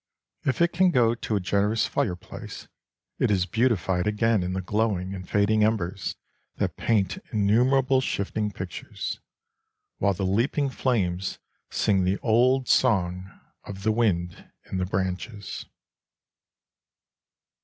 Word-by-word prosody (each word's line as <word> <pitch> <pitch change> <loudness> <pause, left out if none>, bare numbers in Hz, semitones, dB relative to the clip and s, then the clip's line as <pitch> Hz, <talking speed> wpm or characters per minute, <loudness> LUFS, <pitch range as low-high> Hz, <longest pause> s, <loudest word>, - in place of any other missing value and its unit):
If 140 +5 +2
it 170 - +1
can 185 +1 +4
go 120 -8 +3
to 115 -2 -3
a - - +2
generous 100 +4 +1
fireplace, 95 -11 -4 0.5
it - - +2
is 95 -3 +2
beautified 100 -5 +1
again 110 0 +2
in 90 +1 -2
the 95 - -2
glowing 100 -1 0
and 90 -1 -8
fading 105 +1 +3
embers 100 -3 -1 0.4
that - - -2
paint 100 -5 0
innumerable 125 +6 +3
shifting 105 -2 -1
pictures, 90 -3 -6 0.8
while 100 -1 +2
the 95 - -2
leaping 125 +8 +1
flames 95 -9 -1 0.3
sing 95 -3 +2
the 95 +2 +1
old 125 +3 +3
song 95 -6 +2 0.3
of 95 -1 -8
the 110 - +3
wind 95 -7 -1 0.2
in 95 - -1
the 90 - -1
branches. 95 +3 -4
105 Hz, 125 wpm, -26 LUFS, 95-115 Hz, 0.8 s, can